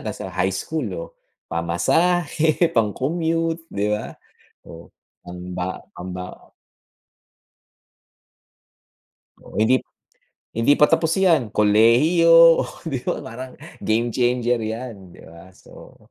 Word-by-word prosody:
nasa -, -, -7 dB
high 95 Hz, +1 st, 0 dB
school, 150 Hz, +8 st, -3 dB
oo, 85 Hz, -, -6 dB, 0.4 s
pamasahe, 160 Hz, -, +1 dB
pang-commute, 165 Hz, -, -1 dB
'di 100 Hz, +1 st, -1 dB
ba? 105 Hz, +1 st, -4 dB, 0.5 s
Oh, 85 Hz, 0 st, -12 dB, 0.4 s
pamba 90 Hz, +1 st, -6 dB
pambaon 90 Hz, +1 st, -9 dB, 2.9 s
Oo, -, -, -16 dB
hindi 125 Hz, +4 st, +4 dB, 0.7 s
hindi 115 Hz, +6 st, +3 dB
pa 150 Hz, -, +5 dB
tapos 165 Hz, +1 st, +1 dB
iyan, 165 Hz, -, +3 dB
kolehiyo, 115 Hz, -, +3 dB, 0.3 s
oh -, -, -3 dB, 0.2 s
'di 140 Hz, -6 st, -3 dB
ba -, -, -2 dB
parang 125 Hz, +3 st, -9 dB, 0.2 s
game 115 Hz, +2 st, 0 dB
changer 120 Hz, 0 st, +1 dB
iyan, 110 Hz, -4 st, -7 dB
'di -, -, -15 dB
ba? 85 Hz, +3 st, -14 dB
So. -, -, -16 dB
115 Hz, 105 wpm, -21 LUFS, 95-160 Hz, 2.9 s, pa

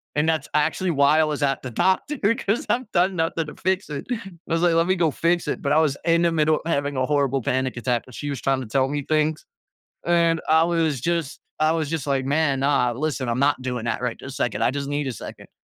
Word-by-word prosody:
and 150 Hz, +1 st, +1 dB
that's 160 Hz, -3 st, 0 dB
actually 160 Hz, +5 st, +1 dB
why 145 Hz, +1 st, +4 dB
I -, -, +5 dB
was 150 Hz, -1 st, -2 dB
at 135 Hz, -1 st, 0 dB
the 130 Hz, -, -6 dB
doctor 190 Hz, -, +1 dB, 0.2 s
'cause 220 Hz, -3 st, -1 dB
I've 245 Hz, -2 st, -1 dB
done 185 Hz, +2 st, +2 dB
nothing 165 Hz, -1 st, -1 dB
to -, -, -9 dB
fix 190 Hz, 0 st, -1 dB
it. 140 Hz, -2 st, -5 dB
I 235 Hz, -, -1 dB, 0.3 s
was 165 Hz, 0 st, 0 dB
like, 175 Hz, -2 st, +4 dB
"Let 165 Hz, +1 st, +2 dB
me 185 Hz, -, +3 dB
go 165 Hz, -4 st, +2 dB
fix 170 Hz, +3 st, 0 dB
it," -, -, -2 dB
but 140 Hz, -, -1 dB
I -, -, +4 dB
was 150 Hz, -3 st, +2 dB
in 170 Hz, 0 st, +3 dB
the 170 Hz, -, +3 dB
middle 155 Hz, -1 st, +3 dB
of -, -, -7 dB
having 145 Hz, -3 st, -1 dB
a 130 Hz, -, +1 dB
horrible 140 Hz, -2 st, +1 dB
panic 130 Hz, -1 st, -1 dB
attack, 120 Hz, 0 st, -1 dB
but 125 Hz, -, -13 dB
she 145 Hz, -, -5 dB
was 140 Hz, -, -5 dB
trying 135 Hz, -1 st, +1 dB
to 125 Hz, -, -7 dB
tell 130 Hz, +4 st, +1 dB
me 145 Hz, 0 st, -2 dB
things, 155 Hz, 0 st, 0 dB, 0.6 s
and 170 Hz, -1 st, +2 dB
I 160 Hz, +1 st, +5 dB
was 165 Hz, -5 st, 0 dB
just 165 Hz, -1 st, -2 dB, 0.2 s
I 155 Hz, +1 st, +3 dB
was 160 Hz, -3 st, -1 dB
just 155 Hz, -2 st, -3 dB
like, 135 Hz, -2 st, 0 dB
"Man, 140 Hz, -1 st, +1 dB
nah, 135 Hz, -3 st, +2 dB
listen, 135 Hz, 0 st, -2 dB
I'm 115 Hz, -, -1 dB
not 140 Hz, -1 st, +2 dB
doing 125 Hz, -2 st, -3 dB
that 115 Hz, -, -2 dB
right 125 Hz, -2 st, -2 dB
this 135 Hz, 0 st, -8 dB
second, 110 Hz, -2 st, -1 dB
I 120 Hz, -, +3 dB
just 140 Hz, 0 st, -4 dB
need 145 Hz, 0 st, -2 dB
a -, -, -3 dB
second." -, -, -10 dB
150 Hz, 255 wpm, -23 LUFS, 135-165 Hz, 0.6 s, I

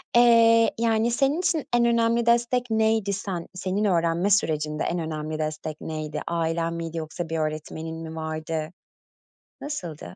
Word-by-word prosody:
eee, 230 Hz, -1 st, +6 dB
yani 230 Hz, 0 st, +2 dB
senin 275 Hz, +7 st, +1 dB
için 330 Hz, -4 st, 0 dB
en 240 Hz, 0 st, +4 dB
önemli 235 Hz, 0 st, +2 dB
destek 240 Hz, +1 st, +2 dB
neydi? 220 Hz, -2 st, +2 dB
Sen 190 Hz, -3 st, -4 dB
senin 185 Hz, +3 st, -2 dB
öğrenme 170 Hz, 0 st, +2 dB
sürecinde, 155 Hz, -6 st, +1 dB
en 175 Hz, -, -1 dB
önemli 155 Hz, -1 st, -4 dB
destek 155 Hz, 0 st, -4 dB
neydi? 155 Hz, -1 st, -4 dB
Ailen 165 Hz, 0 st, -1 dB
miydi 165 Hz, 0 st, -5 dB
yoksa 160 Hz, +1 st, -5 dB
bir 165 Hz, -, -2 dB
öğretmenin 155 Hz, +1 st, -4 dB
mi 160 Hz, 0 st, -7 dB
vardı? 160 Hz, 0 st, -4 dB, 0.9 s
Nasıldı, 170 Hz, -, -6 dB
170 Hz, 140 wpm, -25 LUFS, 160-230 Hz, 0.9 s, eee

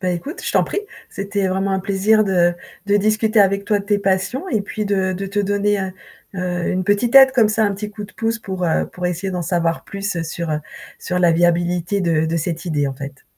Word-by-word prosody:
Bah 185 Hz, -, -1 dB
écoute, 275 Hz, -, -5 dB
je -, -, -2 dB
t'en -, -, +4 dB
prie. 410 Hz, -, -3 dB, 0.3 s
C'était 200 Hz, 0 st, -2 dB
vraiment 195 Hz, +1 st, 0 dB
un 190 Hz, -, +1 dB
plaisir 205 Hz, +3 st, +2 dB
de 175 Hz, -3 st, +2 dB, 0.3 s
de 205 Hz, 0 st, +3 dB
discuter 215 Hz, +2 st, +2 dB
avec 200 Hz, 0 st, +3 dB
toi 205 Hz, -1 st, +2 dB
de -, -, -10 dB
tes 205 Hz, 0 st, +1 dB
passions 195 Hz, -, -1 dB
et 220 Hz, -, 0 dB
puis 210 Hz, +1 st, -4 dB
de 190 Hz, -2 st, 0 dB
de 195 Hz, +2 st, -4 dB
te 200 Hz, +2 st, -3 dB
donner, 205 Hz, 0 st, +1 dB
heu, 190 Hz, -1 st, -3 dB, 0.4 s
heu, 180 Hz, -1 st, -2 dB
une 185 Hz, 0 st, -1 dB
petite 205 Hz, +5 st, +1 dB
aide 265 Hz, -1 st, +9 dB
comme 230 Hz, -5 st, +4 dB
ça, 220 Hz, 0 st, +2 dB
un 200 Hz, -, -1 dB
petit 210 Hz, +1 st, -6 dB
coup 210 Hz, 0 st, -7 dB
de 205 Hz, -, -13 dB
pouce 225 Hz, +1 st, -1 dB
pour, 190 Hz, -4 st, -4 dB
heu, 165 Hz, -, +1 dB
pour 180 Hz, -, -8 dB
essayer 180 Hz, +2 st, -2 dB
d'en 180 Hz, -2 st, -3 dB
savoir 165 Hz, -1 st, -1 dB
plus 200 Hz, -3 st, -3 dB
sur, 165 Hz, +1 st, -4 dB
heu, 150 Hz, 0 st, -1 dB, 0.4 s
sur 180 Hz, -, -2 dB
la 175 Hz, -2 st, +4 dB
viabilité 175 Hz, +3 st, +1 dB
de 165 Hz, -3 st, +1 dB
de 160 Hz, +1 st, -1 dB
cette 165 Hz, +1 st, -3 dB
idée, 150 Hz, -5 st, 0 dB
en 135 Hz, -, -4 dB
fait. 140 Hz, 0 st, -9 dB
195 Hz, 240 wpm, -20 LUFS, 175-205 Hz, 0.4 s, aide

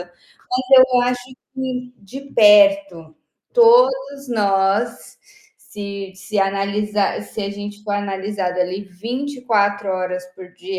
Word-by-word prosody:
mas 175 Hz, -1 st, -15 dB, 0.7 s
eu 250 Hz, -, +4 dB
acho 245 Hz, 0 st, -1 dB, 0.3 s
que 255 Hz, -1 st, -5 dB
de 230 Hz, +8 st, -10 dB
perto, 295 Hz, -, +4 dB, 0.4 s
todos 475 Hz, -, +4 dB
nós, 205 Hz, +2 st, 0 dB, 0.4 s
se 200 Hz, -, -8 dB
se 195 Hz, +2 st, -5 dB
analisar 200 Hz, +1 st, -1 dB
se 215 Hz, -, -8 dB
a 200 Hz, -, -3 dB
gente 205 Hz, +1 st, -8 dB
for 210 Hz, -1 st, -4 dB
analisado 195 Hz, -2 st, -3 dB
ali 185 Hz, +3 st, -2 dB
24 215 Hz, -1 st, -2 dB
horas 185 Hz, -1 st, -3 dB
por 180 Hz, -1 st, -13 dB
dia, 380 Hz, +2 st, -7 dB
205 Hz, 115 wpm, -19 LUFS, 195-250 Hz, 0.7 s, eu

